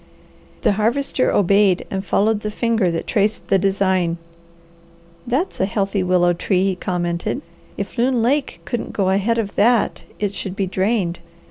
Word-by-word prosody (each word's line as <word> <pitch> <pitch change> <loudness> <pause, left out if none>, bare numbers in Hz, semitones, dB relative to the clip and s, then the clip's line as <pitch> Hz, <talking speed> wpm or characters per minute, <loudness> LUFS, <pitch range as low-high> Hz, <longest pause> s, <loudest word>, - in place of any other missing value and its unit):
The - - +3
Harvester 240 +6 +1
obeyed 200 -1 +3
and 190 0 -2
followed 210 +2 +1
the 210 - -4
finger 225 -3 +1
that 165 -1 -3
traced 210 -1 0
the 195 - +4
design. 190 -3 +1 1.1
"That's 270 +10 -1
a 190 - +2
healthy 195 -1 -1
willow 180 -1 +3
tree!" 185 +2 0
he 195 -1 +1
commented. 175 -2 -2 0.3
"If 200 +4 -5
Loon 245 -1 +2
Lake 275 +3 0
couldn't 240 - -4
go 190 -2 +1
ahead 200 +4 +1
of 210 -3 -2
that 230 +2 +2
it 205 -1 -2
should 190 0 -5
be 195 - 0
drained. 190 -2 0
200 Hz, 155 wpm, -20 LUFS, 185-225 Hz, 1.1 s, the